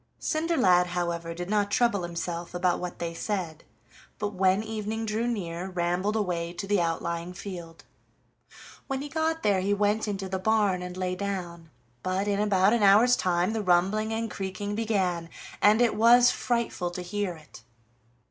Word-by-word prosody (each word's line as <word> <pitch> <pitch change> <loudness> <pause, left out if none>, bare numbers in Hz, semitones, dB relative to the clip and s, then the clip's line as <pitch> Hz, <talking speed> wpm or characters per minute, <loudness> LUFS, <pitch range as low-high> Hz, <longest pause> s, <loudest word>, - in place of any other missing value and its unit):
Cinderlad, 265 - +2
however, 170 -1 -3
did 175 +1 -5
not 205 0 +1
trouble 235 -3 +2
himself 170 0 -5
about 175 0 +1
what 180 -1 -5
they 170 -1 -4
said, 170 -3 -4 0.5
but 210 0 -3
when 190 +2 +2
evening 220 0 -4
drew 220 +2 -1
near 185 -5 -3
rambled 180 +3 -1
away 175 -5 -1
to 195 - -5
the 200 -2 +2
outlying 170 +1 -2
field. 175 -3 -8 1.0
When 270 0 -3
he 290 - -6
got 320 +1 -1
there 200 -3 +2
he 200 +2 +1
went 210 +2 +1
into 195 -2 -3
the 190 0 -3
barn 205 -2 +2
and 180 0 -7
lay 185 -1 -1
down, 180 -4 -5 0.3
but 185 +2 -1
in 200 -1 0
about 200 -1 +3
an 235 - +2
hour's 210 +5 +6
time 180 +3 0
the 220 - -1
rumbling 195 +4 +2
and 225 0 -2
creaking 195 +1 -4
began, 190 -6 -1 0.3
and 215 +3 +5
it 235 - +2
was 240 +2 +6
frightful 235 -7 -1
to 180 +1 -6
hear 195 0 -3
it. 155 -8 -15
195 Hz, 165 wpm, -27 LUFS, 175-215 Hz, 1.0 s, hour's